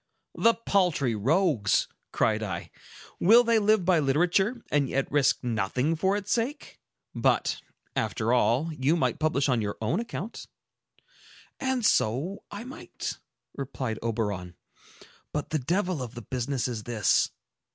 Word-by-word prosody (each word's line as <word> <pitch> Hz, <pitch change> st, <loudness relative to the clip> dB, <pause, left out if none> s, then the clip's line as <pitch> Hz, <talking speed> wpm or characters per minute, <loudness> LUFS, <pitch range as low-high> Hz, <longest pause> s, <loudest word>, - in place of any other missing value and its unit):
"The 230 Hz, 0 st, +3 dB
paltry 180 Hz, -, +1 dB
rogues!" 130 Hz, -, +2 dB, 0.2 s
cried 110 Hz, 0 st, +1 dB
I. 95 Hz, -5 st, -5 dB, 0.5 s
"Will 230 Hz, +6 st, +7 dB
they 230 Hz, -1 st, +3 dB
live 215 Hz, -3 st, +3 dB
by 180 Hz, -2 st, +4 dB
literature, 180 Hz, -, +1 dB
and 140 Hz, -3 st, +2 dB
yet 135 Hz, 0 st, 0 dB
risk 145 Hz, -2 st, +2 dB
nothing 125 Hz, +6 st, 0 dB
for 190 Hz, +5 st, +1 dB
its 205 Hz, 0 st, -5 dB
sake? 250 Hz, +6 st, -2 dB, 0.3 s
But, -, -, +1 dB, 0.3 s
after 115 Hz, +1 st, 0 dB
all, 130 Hz, +6 st, +2 dB
you 145 Hz, +2 st, +1 dB
might 170 Hz, -, 0 dB
publish 155 Hz, -3 st, +1 dB
on 125 Hz, -4 st, +2 dB
your 105 Hz, -1 st, -3 dB
own 115 Hz, -, 0 dB
account." 230 Hz, -2 st, -6 dB, 1.1 s
"And 260 Hz, -3 st, 0 dB
so 140 Hz, -, +1 dB
I 205 Hz, +2 st, -7 dB
might," 255 Hz, +2 st, -7 dB, 0.4 s
replied 130 Hz, -4 st, -4 dB
Oberon. 105 Hz, -6 st, -3 dB, 0.8 s
"But 150 Hz, -1 st, -4 dB
the 155 Hz, -, +1 dB
devil 175 Hz, +3 st, -1 dB
of 125 Hz, -1 st, -6 dB
the 120 Hz, -, -7 dB
business 130 Hz, +1 st, -2 dB
is 120 Hz, -4 st, -4 dB
this. 115 Hz, -4 st, +2 dB
145 Hz, 140 wpm, -27 LUFS, 120-195 Hz, 1.1 s, Will